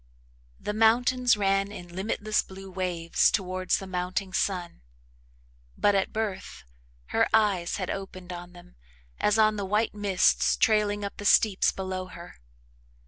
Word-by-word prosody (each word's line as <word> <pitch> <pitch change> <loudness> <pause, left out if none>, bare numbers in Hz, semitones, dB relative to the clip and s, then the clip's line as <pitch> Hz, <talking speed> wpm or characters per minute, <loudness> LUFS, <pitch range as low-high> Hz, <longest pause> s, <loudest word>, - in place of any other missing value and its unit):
The 210 - -4
mountains 240 +2 +3
ran 195 0 +1
in 180 -4 -9
limitless 210 +2 -1
blue 190 0 -11
waves 175 -3 +1
towards 185 -2 0
the 195 - -7
mounting 185 +1 -3
sun 180 - -2 1.0
but 205 - +3
at 195 -1 0
birth 215 -3 -4 0.5
her - - +2
eyes 200 -6 +1
had 185 -3 -3
opened 185 -2 -7
on 175 0 -9
them 175 - -16 0.4
as 210 +1 +2
on 215 -1 +3
the 200 - -2
white 210 +3 0
mists 200 -3 +2
trailing 210 -2 +2
up 200 - -7
the 205 - -7
steeps 200 -1 +4
below 185 -1 -5
her. 175 -1 -12
195 Hz, 140 wpm, -27 LUFS, 185-210 Hz, 1.0 s, steeps